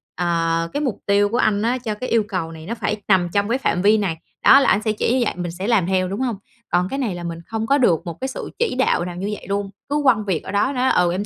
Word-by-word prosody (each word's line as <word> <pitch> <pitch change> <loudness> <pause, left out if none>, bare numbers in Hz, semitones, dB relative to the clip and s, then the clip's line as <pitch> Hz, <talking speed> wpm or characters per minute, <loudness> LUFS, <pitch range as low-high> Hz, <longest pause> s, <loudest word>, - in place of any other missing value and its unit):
Ờ, 165 -1 0
cái 290 - -1
mục 265 -8 -2
tiêu 200 0 +3
của 235 - -1
anh 215 -4 +2
á 235 +3 +1
cho 235 -4 -4
cái 255 +4 -5
yêu 230 -2 +3
cầu 180 -5 -3
này 160 -1 -10
nó 230 - -4
phải 215 -2 -2
nằm 185 -3 +3
trong 200 +1 +1
cái 240 - +2
phạm 180 -9 0
vi 210 +3 +5
này." 190 -6 -1 0.3
Đó, 275 - +9
là 280 - +3
ảnh 210 - +3
sẽ 215 - +2
chỉ 215 +2 0
như 260 - +2
vậy, - - -1
mình 175 -1 -3
sẽ 185 +4 -5
làm 225 -7 +3
theo, 185 -1 +1
đúng 195 +3 -4
hông? 245 -4 -1 0.4
Còn 180 +1 +2
cái 275 - -3
này 225 -9 -1
là 175 - -7
mình 170 -1 -5
không 225 0 -3
có 280 - +4
được 180 - +2
một 170 -2 -6
cái 265 - -1
sự 270 - -6
chỉ 470 - 0
đạo 255 -8 +1
nào 180 -1 -6
như 190 +3 -3
vậy - - -8
luôn, 200 0 -1 0.2
cứ 290 +1 +1
quăng 220 -6 +3
việc 185 -6 -1
ở - - -6
đó, 205 +7 +1
nói: 255 0 +2
"Ừ, 175 -1 +3
em 190 +4 -2
205 Hz, 310 wpm, -21 LUFS, 180-235 Hz, 0.4 s, Đó